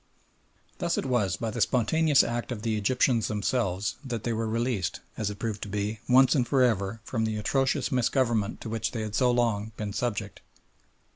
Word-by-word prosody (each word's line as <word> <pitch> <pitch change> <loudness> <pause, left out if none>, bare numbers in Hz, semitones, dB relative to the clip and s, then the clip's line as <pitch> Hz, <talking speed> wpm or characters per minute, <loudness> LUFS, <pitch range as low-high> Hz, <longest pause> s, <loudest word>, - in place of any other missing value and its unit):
Thus 175 -2 0
it - - -1
was 105 -8 +1
by 115 0 -3
the - - -3
spontaneous 145 +4 +3
act 120 +1 -3
of 110 -3 -5
the 115 -2 0
Egyptians 115 +2 +2
themselves 105 -2 -1
that 120 -5 -4
they 120 - -1
were 115 0 -1
released, 115 -4 -1 0.2
as 105 -2 -2
it 105 - -6
proved 105 -1 -3
to 105 - -5
be, 105 +2 -2
once 130 +1 +6
and 125 -5 +1
for 130 +1 +3
ever 110 -2 0
from 115 0 -2
the 110 -1 -1
atrocious 135 +6 0
misgovernment 120 -4 +1
to 115 - -6
which 110 +2 -2
they 115 - -3
had 105 -1 -4
so 125 +3 +3
long 115 -3 0
been 105 -1 -4
subject. 105 -4 -3
115 Hz, 195 wpm, -27 LUFS, 105-125 Hz, 0.2 s, once